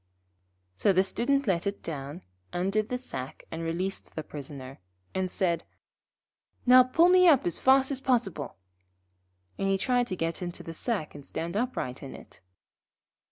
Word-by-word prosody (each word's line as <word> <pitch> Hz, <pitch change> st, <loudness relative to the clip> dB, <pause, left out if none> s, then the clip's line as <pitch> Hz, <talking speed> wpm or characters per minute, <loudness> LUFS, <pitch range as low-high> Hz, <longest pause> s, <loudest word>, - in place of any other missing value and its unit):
So 195 Hz, -, +4 dB
the 190 Hz, +1 st, +4 dB
Student 275 Hz, +8 st, +1 dB
let 185 Hz, -3 st, +1 dB
it 200 Hz, -, -4 dB
down, 145 Hz, +2 st, -6 dB, 0.3 s
undid 195 Hz, +5 st, 0 dB
the 250 Hz, -, -1 dB
sack 135 Hz, -, -6 dB
and 165 Hz, -, -4 dB
released 175 Hz, +4 st, -3 dB
the 155 Hz, -, -3 dB
Prisoner, 140 Hz, -3 st, -8 dB, 0.3 s
and 190 Hz, -1 st, -1 dB
said: 170 Hz, -3 st, 0 dB, 1.0 s
'Now 255 Hz, 0 st, +9 dB
pull 255 Hz, +7 st, +4 dB
me 365 Hz, 0 st, +7 dB
up 290 Hz, -6 st, +6 dB
as 175 Hz, -, -1 dB
fast 265 Hz, +1 st, +4 dB
as 270 Hz, -1 st, -3 dB
possible'; 245 Hz, -, 0 dB, 1.0 s
and 195 Hz, -, 0 dB
he 195 Hz, 0 st, +2 dB
tried 245 Hz, +3 st, +1 dB
to 185 Hz, -, -3 dB
get 165 Hz, 0 st, -2 dB
into 175 Hz, -1 st, -5 dB
the 165 Hz, -, -7 dB
sack 195 Hz, -2 st, -2 dB
and 145 Hz, -, -10 dB
stand 170 Hz, +6 st, -5 dB
upright 210 Hz, -, -2 dB
in 135 Hz, -, -8 dB
it. -, -, -14 dB
190 Hz, 160 wpm, -28 LUFS, 165-250 Hz, 1.0 s, Now